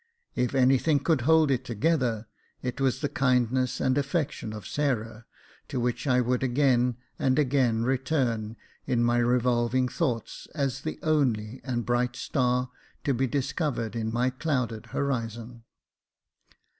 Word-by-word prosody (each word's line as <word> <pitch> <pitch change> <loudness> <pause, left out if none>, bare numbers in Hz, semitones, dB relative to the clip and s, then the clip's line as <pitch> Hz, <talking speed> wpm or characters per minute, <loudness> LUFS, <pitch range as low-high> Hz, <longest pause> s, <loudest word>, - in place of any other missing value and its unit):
If 125 +2 0
any 130 0 +5
thing 155 0 +2
could 160 -6 +2
hold 160 -3 +5
It 130 -1 0
together, 120 -2 0 0.4
it 125 +1 -3
was 135 +1 +1
the 145 - +1
kindness 125 -2 +1
and 130 - +2
affection 140 -5 -2
of 105 -3 -8
Sarah, 115 -6 -2 0.4
to 130 - -3
which 125 +4 -1
I 125 -1 +4
would 125 +1 0
again 125 -2 +2 0.2
and 130 -1 +2
again 130 -5 +2
return 125 -4 0 0.3
in 120 -1 +2
my 120 0 +3
revolving 120 +1 +2
thoughts, 125 -6 -3
as 135 -3 -1
the 155 - -4
only 130 -7 0
and 120 -3 -2
bright 120 0 0
star 125 0 0 0.3
to 140 - +1
be 130 +2 +1
discovered 130 - -2
in 110 -1 -2
my 125 +3 +1
clouded 125 -5 -2
horizon. 115 -3 -3
125 Hz, 145 wpm, -27 LUFS, 120-135 Hz, 0.4 s, any